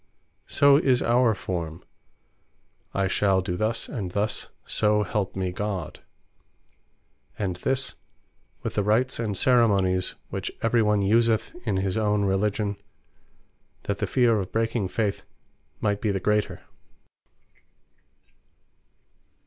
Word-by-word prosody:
So 140 0 +5
is 130 -4 +2
our 120 -1 +3
Forme, 85 -4 -5 1.1
"I 100 - 0
shall 95 -1 +2
do 90 -1 -2
thus, 110 +4 -1
and 100 -9 -5
thus, 105 +1 -1 0.2
so 105 -1 +2
help 100 0 -2
me 95 -1 -2
God." 95 -4 -4 1.4
And 95 -4 -2
this, 130 +7 -1 0.7
with - - -3
the 105 - +1
Rites 110 +6 +1
and 105 -4 -2
Ceremonies, 100 -7 +3 0.2
which - - -3
every 115 +1 +3
one 105 -2 +2
useth 115 +2 +2
in 100 -3 +1
his 95 +1 -1
own 105 -2 +1
Religion, 100 +1 0 1.1
that 100 0 -3
the - - -1
feare 120 -4 +3
of 95 -2 -5
breaking 115 -2 0
faith 105 +1 -2 0.6
might 105 -1 0
be 110 - 0
the 100 -1 0
greater. 105 +1 0
105 Hz, 120 wpm, -25 LUFS, 95-115 Hz, 1.4 s, So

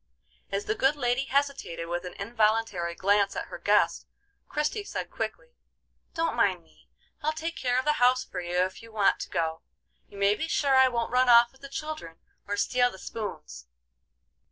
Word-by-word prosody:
As 200 +1 -2
the - - 0
good 270 +5 +2
lady 250 -1 0
hesitated 275 -12 -1
with 175 +1 -3
an 180 - -7
involuntary 215 -5 0
glance 200 +2 +2
at - - -4
her - - -8
guest, - - +2 0.4
Christie 300 +8 -1
said - - -5
quickly: - - -5 0.6
"Don't 330 0 0
mind 190 -7 +2
me; 160 - -26 0.3
I'll 305 0 +1
take 325 +2 -4
care 250 -1 0
of 260 - 0
the 300 - +3
house 255 +1 +5
for - - -5
you 175 +1 +1
if 185 +1 -5
you 230 0 -13
want 210 -3 +2
to - - -6
go. 160 -1 -2 0.5
You 200 - -14
may 200 +1 +4
be 315 +9 -3
sure 280 -4 +2
I 260 0 +7
won't 235 -2 -2
run 250 0 +4
off 235 0 +7
with 265 - -24
the 275 - -9
children 305 - -6 0.3
or 205 0 -2
steal 245 +4 +2
the 190 - -11
spoons." 65 - -7
235 Hz, 190 wpm, -28 LUFS, 195-275 Hz, 0.6 s, I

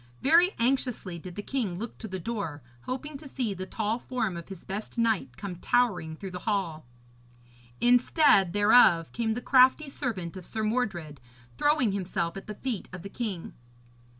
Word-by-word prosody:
Very 340 +6 +5
anxiously 240 -7 0
did 180 +1 -9
the 205 - -5
king 220 -10 -2
look 225 +4 -6
to 220 - -6
the 190 -2 -4
door, 180 - -4 0.2
hoping 275 +3 -4
to 295 - -10
see 250 -6 -2
the 185 0 -6
tall 220 +3 -1
form 230 -7 -2
of 170 +1 -8
his 190 -3 -9
best 205 +5 -6
knight 220 - 0
come 190 -3 -6
towering 180 -7 +1
through 190 +3 -7
the 180 - -5
hall. 175 - -2 0.9
Instead 245 - +4
thereof 205 -5 +5
came 225 -1 -1
the 245 - -4
crafty 260 +4 +5
servant 195 - -4
of 185 -2 -9
Sir 220 - -3
Mordred, 195 - -2 0.3
throwing 290 - +2
himself 185 -3 -2
at 195 - -8
the 210 - -6
feet 235 -3 -4
of 180 -1 -8
the 200 - -7
king. 200 -7 -5
210 Hz, 175 wpm, -28 LUFS, 180-245 Hz, 0.9 s, Very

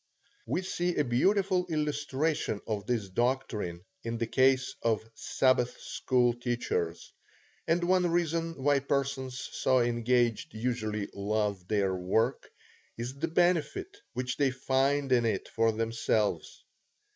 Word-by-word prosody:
We 185 - -1
see 175 -1 -1
a 150 - +2
beautiful 185 +8 +2
illustration 150 -4 -1
of 105 -3 -3
this 115 -5 0
doctrine 105 -5 -1 0.2
in 115 0 -3
the 115 - 0
case 130 +2 +3
of 110 -1 0
Sabbath 125 0 +1
school 125 -2 +1
teachers, 120 -9 -2 0.5
and 170 +2 +2
one 180 0 +3
reason 165 -3 -1
why 145 0 +4
persons 135 -2 -2
so 130 0 +1
engaged 120 -1 +1
usually 110 -3 -2
love 100 -2 -1
their 100 -2 +1
work, 95 +5 0 0.5
is 120 +2 -4
the 165 - 0
benefit 180 - +1 0.2
which 125 0 -3
they 140 -2 +3
find 135 +2 +1
in 120 -2 +4
it 110 -4 -1
for 115 0 +2
themselves. 110 -5 -1
125 Hz, 125 wpm, -30 LUFS, 110-145 Hz, 0.5 s, why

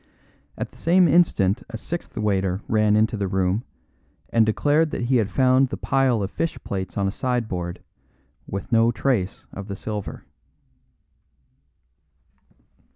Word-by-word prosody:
At - - -4
the - - -19
same 175 +1 +4
instant 125 - +3
a 115 - -5
sixth 170 +5 -6
waiter 95 -2 0
ran 105 -1 +3
into 110 +1 +2
the 100 -1 -1
room, 95 +3 0 0.7
and 115 -1 +3
declared 150 +8 +2
that 125 - -3
he 125 +1 +2
had 105 -4 +1
found 130 +1 +3
the - - -4
pile 130 -5 +1
of 95 - -4
fish 165 - -2
plates 95 -1 -4
on 100 -1 +1
a - - 0
sideboard, 110 -8 -3 0.6
with 100 +5 -5
no 115 0 +4
trace 115 -6 -1
of 100 0 -7
the 100 - -5
silver. 105 0 -6
110 Hz, 145 wpm, -23 LUFS, 100-130 Hz, 0.7 s, same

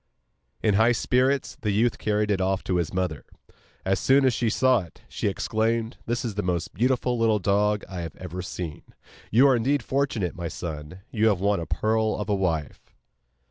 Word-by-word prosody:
In 105 - +3
high 110 +4 +4
spirits 130 +3 +1
the 105 - -1
youth 110 +4 +1
carried 105 0 0
it 95 -2 +1
off 95 0 0
to 90 - 0
his 85 -3 -1
mother. 90 -5 -2 0.6
As 95 +1 +1
soon 135 +1 +4
as 130 - +4
she 115 0 0
saw 130 +2 +3
it, 85 -4 -12
she - - -3
exclaimed: 110 +3 -1
'This 120 +1 -1
is 115 - -2
the 105 - -2
most 90 -4 -2
beautiful 125 +2 +1
little 110 -2 +3
dog 105 +1 +1
I 90 -3 -6
have 80 -3 -6
ever 90 0 -6
seen. 90 -3 -6 0.5
You 125 +6 +6
are 135 - +5
indeed 130 +3 +1
fortunate, 130 -10 -1
my 85 -1 -4
son; 80 +1 -7
you 110 -1 +2
have 100 -5 +2
won 100 0 +1
a 85 - -5
pearl 110 +2 +1
of 105 0 -4
a - - +2
wife. 80 -7 -2
105 Hz, 195 wpm, -25 LUFS, 90-115 Hz, 0.6 s, You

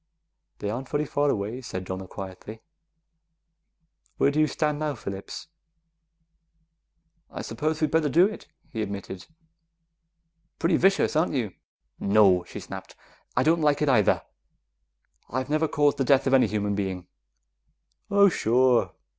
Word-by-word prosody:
"They 100 - -3
aren't 125 +3 -5
very 150 +1 0
far 145 0 0
away," 110 +3 -2
said 95 -6 -6
Donna 95 +1 -5
quietly. 95 +4 -9 1.5
"Where 140 - +3
do 150 - -1
you 155 - +4
stand 150 +1 -1
now, 150 -2 -2
Phillips?" 100 -3 -7 1.8
"I - - -7
suppose 155 0 -2
we'd 155 -2 0
better 160 -2 +2
do 170 +7 +5
it," 210 +1 -5 0.2
he 110 - -3
admitted. 100 -2 -6 1.3
"Pretty 170 0 +2
vicious, 195 -4 +2
aren't 155 +2 +2
you?" 115 -7 -1 0.5
"No!" 100 -3 +4
she - - -8
snapped. - - -9 0.4
"I 125 - +4
don't 165 +3 +3
like 150 -1 +2
it 150 - +2
either; 110 -6 +3 1.1
I've 130 +2 -3
never 155 +1 +2
caused 145 -1 +1
the - - +3
death 135 +1 +3
of 135 - +1
any 130 - +5
human 105 -1 -1
being." 95 -3 -3 1.0
"Oh, 200 0 +6
sure. 125 - +2
130 Hz, 140 wpm, -26 LUFS, 100-150 Hz, 1.8 s, Oh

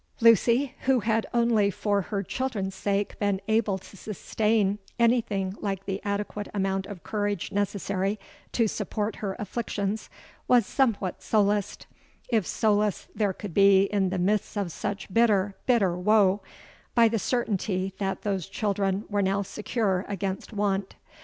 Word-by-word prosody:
_'—Lucy, 235 +4 +4
who 260 -2 +3
had 225 0 +1
only 235 -4 +3
for 200 +1 0
her 200 +2 -3
children's 210 -4 -3
sake 200 +1 -1
been 200 -2 +1
able 220 -3 +2
to 190 - -14
sustain 210 0 0 0.2
anything 225 -5 +2
like 195 -2 -3
the 195 0 -3
adequate 205 0 -3
amount 195 -1 0
of 200 -4 -9
courage 205 -4 -2
necessary 200 0 -1 0.3
to 230 -2 +2
support 210 +1 -3
her 195 -2 -3
afflictions, 210 -1 -3 0.4
was 245 -4 +5
somewhat 215 -9 0
solaced—if 210 +1 -1
solace 210 -2 +1
there 205 -3 +1
could 190 -1 -7
be 195 0 +6
in 195 -2 +2
the 190 - -2
midst 205 +3 0
of 195 -4 -1
such 200 +4 -4
bitter, 205 -4 +3
bitter 205 -8 +3
woe—by 210 +4 +1
the 225 0 0
certainty 195 -5 -1
that 195 -1 -2
those 195 -5 -1
children 200 -1 -1
were 205 -1 0
now 195 +1 +1
secure 200 -1 -1
against 195 0 -3
want. 200 -2 -1
205 Hz, 140 wpm, -27 LUFS, 195-220 Hz, 0.4 s, be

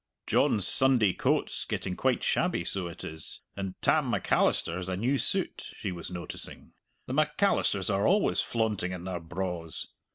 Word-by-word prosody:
"John's 100 -4 +5
Sunday 125 -8 +5
coat's - - 0
getting - - -3
quite - - +1
shabby, - - +1
so 95 -3 -2
it 85 +1 -9
is, 80 0 -8
and 95 -2 -5
Tam - - +3
Macalister 85 - +1
has 90 0 -5
a 90 - -2
new 130 +7 +1
suit, - - -2
she 95 - -3
was 85 -2 -7
noticing 90 -1 -8 0.3
the 125 - -5
Macalisters 150 - +1
are 100 +2 +2
always 200 +2 +3
flaunting 105 -6 -1
in 90 -1 -6
their 90 -1 -4
braws! 85 -1 -5
95 Hz, 160 wpm, -29 LUFS, 90-115 Hz, 0.3 s, John's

